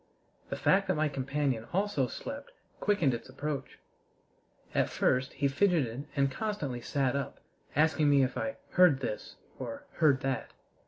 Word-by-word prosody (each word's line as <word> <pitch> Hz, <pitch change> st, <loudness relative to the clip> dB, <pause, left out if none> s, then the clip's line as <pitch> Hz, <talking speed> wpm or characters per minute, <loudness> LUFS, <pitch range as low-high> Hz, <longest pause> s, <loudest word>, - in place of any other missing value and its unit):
The -, -, -2 dB
fact 195 Hz, +1 st, +3 dB
that 185 Hz, -, +2 dB
my 155 Hz, 0 st, +1 dB
companion 135 Hz, -3 st, -1 dB
also 190 Hz, -9 st, +1 dB
slept 280 Hz, -, -7 dB, 0.3 s
quickened 175 Hz, -11 st, +2 dB
its 120 Hz, -, -5 dB
approach. 145 Hz, +2 st, -4 dB, 1.0 s
At -, -, +2 dB
first 130 Hz, +1 st, +1 dB
he 140 Hz, -, +1 dB
fidgeted 140 Hz, -, +1 dB
and 140 Hz, -1 st, +2 dB
constantly 145 Hz, -, -3 dB
sat 135 Hz, 0 st, 0 dB
up, 140 Hz, -1 st, -3 dB, 0.4 s
asking 155 Hz, 0 st, +4 dB
me 140 Hz, -1 st, +5 dB
if 130 Hz, -1 st, -1 dB
I 275 Hz, -, -2 dB
"heard 180 Hz, -7 st, +5 dB
this" -, -, -4 dB, 0.2 s
or 285 Hz, +1 st, -6 dB
"heard 145 Hz, -5 st, +4 dB
that." 135 Hz, -3 st, -2 dB
145 Hz, 150 wpm, -31 LUFS, 135-185 Hz, 1.0 s, me